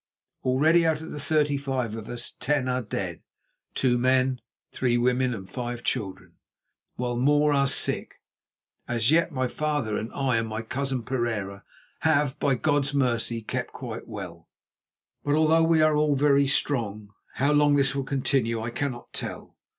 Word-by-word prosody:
Already 155 +7 +4
out 160 -2 +2
of 160 - -8
the 150 - -6
thirty 150 -1 +1
five 130 -5 -2
of 110 -1 -7
us, 120 0 -5
ten 135 +1 0
are 125 0 0
dead, 95 -6 -4 0.5
two 120 -2 +2
men, 130 0 +2 0.3
three 120 -2 +1
women, 125 +1 +2
and 95 -5 -6
five 120 +2 -5
children, 95 -7 -4 0.6
while 125 0 -2
more 145 +4 +3
are 140 -1 +3
sick. 135 - 0 0.7
As 120 +2 +1
yet 165 +1 +3
my 130 -3 -1
father 145 -6 -1
and 110 - -5
I 130 -4 +1
and 115 0 -1
my 110 +1 -4
cousin 130 +1 -3
Pereira 110 -6 -3 0.4
have, 150 -3 +1
by 135 -2 +2
God's 145 +1 0
mercy, 120 -3 0
kept 125 +2 -4
quite 120 -3 -7
well; 90 -6 -8 0.7
but 145 0 +1
although 160 +1 +4
we 165 -1 +4
are 155 -1 +4
all 150 -1 +2
very 140 0 +4
strong, 110 -7 -1 0.2
how 140 +3 +2
long 145 -1 +4
this 135 -2 +2
will 140 0 -2
continue 130 -4 0
I 115 +1 -4
cannot 125 -1 -4
tell. - - -6
130 Hz, 165 wpm, -26 LUFS, 115-145 Hz, 0.7 s, Already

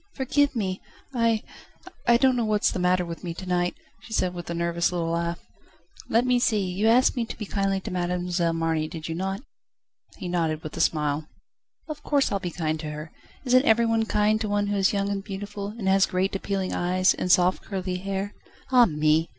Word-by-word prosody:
"Forgive 280 +1 +1
me! 190 -4 -2 0.3
I 230 -3 +2 0.6
I 235 - +6
don't 260 0 +4
know 240 - +1
what's 215 -1 +2
the - - -3
matter 180 0 +2
with 170 +1 -7
me 170 -2 -4
to 185 - -7
night," 175 -1 0 0.3
she 225 - -10
said 185 -4 +1
with 175 -1 -7
a 170 - -2
nervous 170 +1 0
little 170 -2 -1
laugh. 170 0 -1 0.7
"Let 235 +2 +3
me 250 -1 +3
see, 235 -3 +2
you 185 +4 0
asked 245 +3 +5
me 240 - 0
to 230 - -7
be 210 - -5
kind 195 -1 -1
to - - -4
Mademoiselle 175 -1 0
Marny, 165 -1 0
did 160 -1 -7
you 165 - -3
not?" 195 +6 -3 0.7
He 180 - -6
nodded 165 -3 -1
with 155 - -7
a - - -1
smile. 150 -1 0 0.6
"Of 305 -2 -6
course 285 -2 +1
I'll 200 - 0
be 180 - -3
kind 155 -2 -2
to 155 -1 -5
her. 150 +1 -7 0.3
Isn't 255 +2 +4
every 235 -2 +4
one 225 -1 +1
kind 215 +1 +2
to 215 - -1
one 205 0 +1
who 205 - 0
is 195 0 +3
young 200 -1 0
and 200 -1 -2
beautiful, 200 0 -6
and 210 -1 -5
has 195 0 +4
great, 190 +2 0
appealing 195 -1 -2
eyes, 185 +1 +2
and 180 - -1
soft, 180 +1 +4
curly 185 -2 -3
hair? 195 +2 -3 0.4
Ah 250 -2 +7
me! 155 0 +2
190 Hz, 215 wpm, -25 LUFS, 170-215 Hz, 0.7 s, Ah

